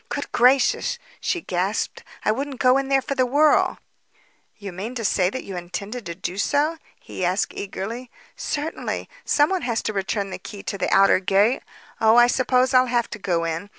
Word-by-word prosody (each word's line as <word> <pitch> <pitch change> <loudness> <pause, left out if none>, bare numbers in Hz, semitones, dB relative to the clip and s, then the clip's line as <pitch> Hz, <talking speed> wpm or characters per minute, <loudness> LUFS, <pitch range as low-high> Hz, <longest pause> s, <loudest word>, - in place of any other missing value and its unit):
"Good - - -4
gracious!" 250 +2 +3 0.2
she 350 - -1
gasped. 190 - -2 0.2
"I - - +4
wouldn't 270 +4 -3
go 255 +1 +4
in 275 0 -4
there 270 -1 +3
for 275 - -2
the 260 -2 +2
world." 290 +4 +3 0.8
"Do 205 - -13
you 195 - -4
mean 205 +8 -6
to 230 -3 -3
say 185 -2 +2
that 260 - -5
you 195 - -7
intended 200 +5 -6
to 170 - -5
do 185 +1 -5
so?" 300 +8 +1 0.2
he - - -7
asked 185 +3 0
eagerly. 225 +5 -6 0.3
"Certainly. 300 +2 -3 0.2
Someone 345 +5 +2
has 235 -2 -1
to 215 - -2
return 195 0 -2
the - - -6
key 205 -3 -9
to 200 - -4
the - - -1
outer 195 -1 +5
gate. 200 +5 +2 0.4
Oh, 220 0 +5
I 240 0 +8
suppose 255 +1 +2
I'll 255 0 +5
have 240 -1 0
to 210 - -6
go 175 -3 0
in. 165 +4 -3
225 Hz, 195 wpm, -23 LUFS, 195-260 Hz, 0.8 s, I